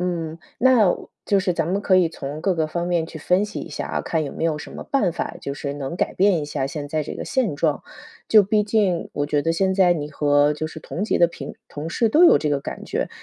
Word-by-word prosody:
嗯， 170 -3 -3 0.2
那 245 -5 +5
我 - - -5 0.2
就 200 -1 +3
是 185 -1 0
咱 165 -2 -1
们 195 +2 0
可 185 - +4
以 180 -2 +4
从 145 -1 -6
各 190 +2 +1
个 160 -1 0
方 170 +2 -2
面 170 -2 +1
去 160 - -9
分 180 +6 +2
析 210 -1 -6
一 - - -7
下 150 - -5
啊， - - -1
看 160 -1 -1
有 - - -6
没 - - -4
有 160 -2 +1
什 - - -8
么 - - -8
办 220 - +1
法， - - -4
就 140 - -4
是 140 -1 -4
能 140 +3 -5
改 - - -1
变 190 -3 +3
一 - - -3
下 140 -2 -3
现 145 0 -5
在 155 +1 -1
这 150 - -6
个 - - -6
现 230 - 0
状。 150 -1 0 0.5
就 215 -2 +7
毕 210 +2 +2
竟 205 -5 0
我 145 0 -1
觉 145 0 0
得 165 - +1
现 190 +2 +1
在 185 -2 +5
你 150 -3 -3
和 145 0 +2
就 155 +1 -4
是 160 - -9
同 165 +4 -5
级 215 - +1
的 175 - +6
平 155 -5 -8
同 150 +3 -6
事 230 +6 +1
都 305 +10 +4
有 340 - +7
这 150 - -1
个 145 -1 0
感 - - -7
觉， - - -2
165 Hz, 295 characters per minute, -22 LUFS, 150-195 Hz, 0.5 s, 就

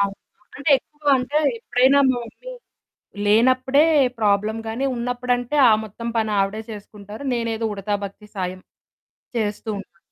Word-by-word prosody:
అవును. 200 0 +1 0.4
అంటే 290 +1 -1
ఎక్కువగా 295 +1 -2
అంటే 280 +4 0 0.2
ఎప్పుడైనా 250 +4 +3
మా 245 - 0
మమ్మీ - - -10 0.7
లేనప్పుడే 255 +6 +4 0.4
ప్రాబ్లమ్ 210 +1 +1
గాని 240 +5 -2
ఉన్నప్పుడంటే 245 +2 -1
ఆ - - +6
మొత్తం 230 +3 -7
పని 220 -1 +1
ఆవిడే 195 +2 -1
చేసుకుంటారు. 210 +2 -10
నేనేదో 230 -1 -2
ఉడతా 205 +1 -3
భక్తి 200 +2 -9
సాయం 185 -1 -3 0.8
చేస్తూ 210 -1 -2
ఉంటా. 190 -3 -13
225 Hz, 130 wpm, -22 LUFS, 205-250 Hz, 0.8 s, ఆ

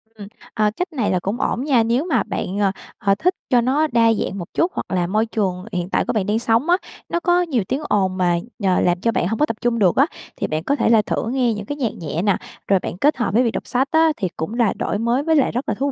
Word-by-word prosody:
Ừm, 205 -2 -9 0.3
ờ, 210 -1 +2
cách 360 -1 -3
này 235 -9 0
là 185 - +1
cũng 195 +6 -3
ổn 250 - -1
nha, 260 -6 +3
nếu 240 +7 +1
mà 260 - +1
bạn, 190 - -4
ờ, 195 -2 +2 0.3
ờ, 195 -1 +2
thích 365 +2 +2
cho 245 -3 +4
nó 285 +6 +2
đa 230 -3 +3
dạng 200 -2 -3
một 175 - -5
chút 345 +3 +1
hoặc - - -3
là 175 -2 +1
môi 215 +4 +1
trường 190 -5 -2
hiện 180 0 -3
tại - - +1
của - - -1
bạn 210 -4 0
đang 210 +2 +1
sống 235 +6 +1
á, 355 - +5 0.3
nó 340 - 0
có 350 0 +2
nhiều 280 - 0
tiếng 275 - -1
ồn 190 -2 +1
mà, 175 -2 +2 0.2
nhờ, 190 -3 +2
làm 175 0 +1
cho 230 +2 +2
bạn 175 - 0
hông 220 +3 -2
có 300 - +4
tập 225 - -4
trung 240 -1 0
được 185 -5 +3
á, 275 - +5 0.3
thì - - -2
bạn 155 +1 -2
có 280 - +1
thể - - +1
là 225 -2 +5
thử 210 - -2
nghe 250 -2 +1
những 210 -1 -6
cái 290 - -4
nhạc 255 -6 -2
nhẹ 165 +1 -3
nè, 200 -1 +2 0.3
rồi 195 -1 +4
bạn 175 - -6
kết 295 +7 +2
hợp 235 -5 -1
với 245 - +4
việc 230 - +1
đọc - - -5
sách 260 +3 +1
á 320 0 +4
thì 190 - -1
cũng 160 +7 -4
là 235 -3 +2
đổi - - -2
mới 240 +4 +1
với 320 0 +2
lại 280 - +3
rất 250 +4 -3
là - - 0
thú 280 +1 -1
230 Hz, 295 wpm, -21 LUFS, 195-270 Hz, 0.3 s, á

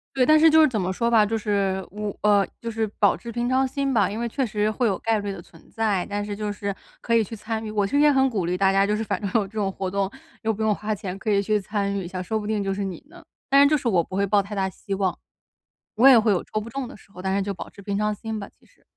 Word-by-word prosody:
对， 255 -2 +3
但 310 +3 +6
是 320 +1 +7
就 315 +1 +6
是 310 - +6
怎 220 -4 -1
么 185 +1 -1
说 235 +4 0
吧， 220 -2 +5
就 225 +2 -1
是 200 -3 -1
我 210 0 -5
呃， 205 -1 +4
就 230 0 -4
是 220 0 -1
保 205 - +4
持 235 - -9
平 240 +1 -1
常 260 +1 +2
心 275 0 -1
吧， 205 -5 +3
因 210 - -5
为 235 0 -2
确 265 +2 -1
实 210 -1 0
会 240 +1 0
有 195 - 0
概 225 -1 +1
率 205 0 -4
的 195 -3 -6
存 165 - -19
在， 215 -5 0
但 205 0 -2
是 205 - -4
就 205 0 -3
是 200 -1 -3 0.3
可 230 - -1
以 230 - +5
去 225 +2 -5
参 220 +1 -4
与。 215 - -4
我 205 -2 0
其 - - -5
实 285 - +3
也 295 0 +6
很 265 -1 +3
鼓 195 -7 -2
励 180 +1 -1
大 195 0 +3
家 195 +1 +3
就 210 - +1
是 220 - -2
反 - - -2
正 200 - -2
有 225 - +4
这 195 - -14
种 195 -1 0
活 190 -1 -4
动， 195 -1 0 0.3
又 225 0 +1
不 215 - -6
用 215 -1 +3
花 215 +1 -3
钱， 190 0 -6
可 215 - -3
以 200 -1 +3
去 210 0 +1
参 200 0 -2
与 200 - -2
一 - - -5
下， 185 0 -5
说 220 +4 -2
不 210 - -6
定 215 -2 0
就 195 0 -1
是 200 - -4
你 185 +2 -6
呢。 345 0 -14 0.3
但 275 +1 +6
是 285 - +7
就 305 - +3
是 250 - -1
我 185 -5 +3
不 185 - -8
会 200 +1 +2
抱 200 +1 +3
太 205 +1 -7
大 190 -1 0
希 195 +1 -7
望。 190 -2 -1 0.8
我 245 +5 +6
也 250 - +8
会 215 -1 +2
有 180 - +1
抽 215 - -3
不 230 - -8
中 265 +1 -4
的 - - -11
时 195 - -20
候， 180 - -10
但 190 +1 -1
是 200 - +1
就 200 0 -2
保 - - -8
持 200 - -14
平 200 0 -3
常 210 0 0
心 220 +1 -5
吧， 200 - -7
其 - - -28
实。 - - -29
210 Hz, 350 characters per minute, -24 LUFS, 195-225 Hz, 0.8 s, 也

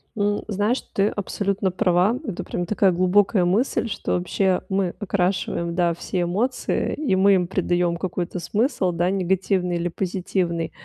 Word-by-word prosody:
М, 205 -1 0
знаешь, 210 +4 0
ты 200 +1 +2
абсолютно 200 -1 -1
права. 180 +5 +2
Это 185 - -4
прям 175 - -3
такая 195 0 +3
глубокая 185 +2 +3
мысль, 225 +6 +1
что - - -3
вообще 185 +1 +1
мы 190 -2 0
окрашиваем, 180 -3 -1
да, 175 -1 +2
все 180 +2 -3
эмоции, 205 +9 -1
и 290 -11 0
мы 195 +1 +5
им 180 -2 +1
придаём 175 -2 0
какой-то 180 0 -3
смысл, 205 - 0
да, 175 +1 0
негативный 190 -1 0
или 170 +1 -1
позитивный. 175 -2 -2
185 Hz, 150 wpm, -23 LUFS, 175-200 Hz, -, мы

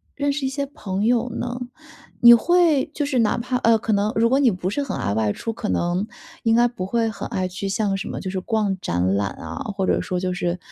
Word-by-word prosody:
认 285 0 0
识 280 -1 -2
一 - - 0
些 280 +1 -2
朋 205 -9 -4
友 240 +1 +2
呢？ 245 +1 -4 0.6
你 235 0 +10
会 330 +2 +4
就 295 - -1
是 270 -4 0
哪 220 - +2
怕 250 +2 -1
呃， 230 -2 +4
可 220 - -3
能 210 +1 +1
如 230 +1 +3
果 265 +3 +3
你 270 -4 +5
不 185 -1 -2
是 285 - -2
很 275 - -3
爱 100 - -1
外 105 -1 +1
出， 225 - -4
可 225 -1 -5
能， 180 +4 0 0.4
应 225 -1 +3
该 240 +1 +5
不 225 -6 -5
会 225 +2 0
很 220 - -6
爱 185 -1 -2
去 190 +2 -5
像 195 -1 0
什 195 - -5
么 - - -5
就 185 - -4
是 190 - -2
逛 205 0 -1
展 90 - -1
览 100 -1 0
啊， 80 0 -8 0.2
或 195 -1 0
者 - - +2
说 180 - -3
就 185 0 -1
是 175 0 -2
220 Hz, 270 characters per minute, -22 LUFS, 185-245 Hz, 0.6 s, 你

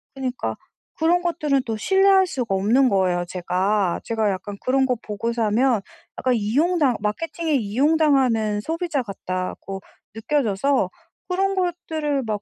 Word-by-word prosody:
그니까 260 -2 -3 0.4
그런 340 +2 +2
것들은 305 -6 0
또 225 - -2
신뢰할 385 - +4
수가 245 - -2
없는 230 +8 +3
거예요 185 -3 +1
제가. 185 +1 0
제가 220 -2 0
약간 200 +2 -6
그런 265 +1 +2
거 255 -1 +1
보고 220 +3 -3
사면 230 0 +2 0.4
약간 255 - +1
이용당 270 - +2
마케팅에 320 - -2
이용당하는 255 -3 +2
소비자 325 +1 -2
같다고 195 -2 -5 0.3
느껴져서 265 +1 +1 0.4
그런 390 +2 +1
것들을 320 -6 -1
막 210 -2 -2
250 Hz, 300 characters per minute, -23 LUFS, 210-315 Hz, 0.4 s, 신뢰할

